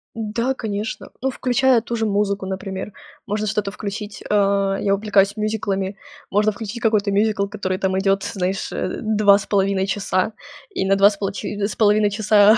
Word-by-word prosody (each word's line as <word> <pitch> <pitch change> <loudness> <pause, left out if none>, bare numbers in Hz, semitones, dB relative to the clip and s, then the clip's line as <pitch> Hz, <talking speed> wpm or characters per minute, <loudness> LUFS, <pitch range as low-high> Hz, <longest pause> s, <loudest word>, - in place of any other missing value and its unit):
Да, 230 +3 -1
конечно. 215 -2 -4
Ну, 265 - +1
включая 255 -1 +2
ту 235 +1 -4
же 225 -1 0
музыку, 200 -1 0
например. 190 +1 -5 0.3
Можно 210 +1 -1
что-то 210 -1 -1
включить. 205 0 -6
А, 200 -1 +2
я 195 -1 +2
увлекаюсь 200 0 +2
мюзиклами. 200 -2 -2 0.3
Можно 210 +2 +3
включить 220 +2 -6
какой-то 215 -2 +2
мюзикл, 205 0 +2
который 190 -2 -3
там 190 0 0
идёт, 195 0 +1
знаешь, 190 -1 -2
э, 185 - -3
2,5 200 -2 +3
часа, 195 0 0 0.5
и 190 - +1
на 195 +1 +3
2 195 +1 +6
с 205 - -8
полочи 200 +1 -4
с 205 - -1
половиной 210 -1 +4
часа 210 +1 +5
205 Hz, 160 wpm, -21 LUFS, 195-215 Hz, 0.5 s, 2